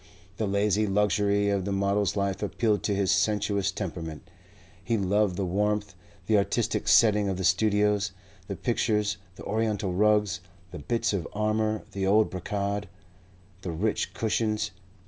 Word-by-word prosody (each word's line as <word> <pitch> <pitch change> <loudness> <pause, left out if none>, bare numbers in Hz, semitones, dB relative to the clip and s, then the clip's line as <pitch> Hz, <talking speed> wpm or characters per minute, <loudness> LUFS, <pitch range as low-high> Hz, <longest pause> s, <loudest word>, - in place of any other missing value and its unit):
The 110 - -1
lazy 105 +1 +1
luxury 100 0 +2
of 100 -2 0
the 100 - -3
model's 100 0 +1
life 100 -1 -1
appealed 105 0 0
to 100 - +1
his 100 -1 +1
sensuous 100 0 +1
temperament. 85 -5 -6 0.6
He 115 - 0
loved 100 -1 +1
the 95 +1 -1
warmth, 105 +2 -1 0.3
the 105 +1 +4
artistic 100 - -1
setting 105 -3 +5
of 95 - -2
the 95 - -3
studios; 105 +1 +2 0.4
the 100 - -4
pictures, 105 -2 0 0.2
the - - -11
oriental 105 -3 -1
rugs, 105 -1 +2 0.3
the 85 - -7
bits 115 +9 -1
of 90 -5 -2
armour, 110 +1 0
the 95 -1 -2
old 105 +2 +4
brocade, 100 +2 -3 0.7
the 90 - -4
rich 100 +7 -1
cushions. 110 -1 0
100 Hz, 145 wpm, -27 LUFS, 95-105 Hz, 0.7 s, setting